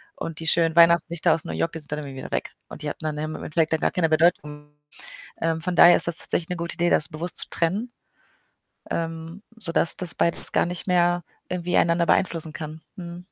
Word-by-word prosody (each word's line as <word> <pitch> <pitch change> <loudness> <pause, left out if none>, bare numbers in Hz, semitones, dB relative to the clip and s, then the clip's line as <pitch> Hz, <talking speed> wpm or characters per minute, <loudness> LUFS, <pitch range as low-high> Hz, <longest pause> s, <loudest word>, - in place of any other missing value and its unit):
und 165 - -6
die 165 - -6
schönen 165 0 +2
Weihnachtslichter 170 0 +4
aus 165 +2 -3
New - - -5
York, 165 - -1
die 165 - -5
sind 145 -2 -8
dann 150 - -2
irgendwie 140 -3 -8
wieder - - -8
weg - - -3 0.2
und - - -10
die - - -2
hatten - - -7
dann 155 -1 -3
im 155 +1 -4
im - - -8
Endeffekt 160 0 0
dann 160 - +1
gar - - +1
keine 165 -3 0
Bedeutung. 150 -2 0 0.7
Ähm, 165 0 -1
von 180 +1 -2
daher 175 +1 +8
ist - - +2
das 170 - +1
tatsächlich 165 - -1
'ne 180 - -2
gute 170 0 -4
Idee, 175 +1 +1
das 150 - +3
bewusst 165 +2 -4
zu - - -2
trennen, 200 +9 -1 1.0
ähm, 165 +2 -4 0.2
sodass 170 -5 +2
das 180 -2 -2
beides 170 - +1
gar - - +2
nicht 175 +1 -6
mehr 175 -1 +2 0.3
irgendwie 180 -1 -1
einander 170 0 +2
beeinflussen 165 -4 +1
kann, 155 +1 -7
mhm. 175 -2 -9
165 Hz, 220 wpm, -24 LUFS, 160-175 Hz, 1.0 s, daher